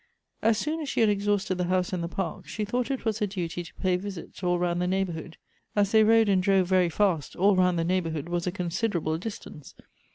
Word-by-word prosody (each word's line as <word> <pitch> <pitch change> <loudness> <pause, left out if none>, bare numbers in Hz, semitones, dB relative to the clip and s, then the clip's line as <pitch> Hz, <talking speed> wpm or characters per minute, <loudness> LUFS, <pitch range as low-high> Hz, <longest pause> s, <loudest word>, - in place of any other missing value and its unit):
As 220 0 +3
soon 310 +6 -2
as 295 - -4
she - - 0
had 220 - +5
exhausted 200 -2 0
the 180 - +1
house 185 +1 0
and 180 - -1
the - - -2
park, 175 -1 -4
she 215 - -3
thought 245 +4 -1
it 270 -3 -3
was 220 -1 0
her 210 - +1
duty, 175 -3 -4
to 170 - -11
pay 185 -2 +1
visits 190 -2 -8
all 175 -1 +1
round 175 0 0
the 180 - 0
neighborhood. 180 -3 -2 0.4
As 205 -1 +2
they 220 -1 +6
rode 225 0 +5
and 195 -2 +3
drove 190 0 +3
very 185 -2 +3
fast, 175 -4 0
all 195 +2 +4
round 180 -1 +3
the 165 - +1
neighborhood 165 -4 -1
was 175 0 -2
a - - +1
considerable 175 -3 -1
distance. 175 -8 -8
185 Hz, 230 wpm, -27 LUFS, 175-205 Hz, 0.4 s, they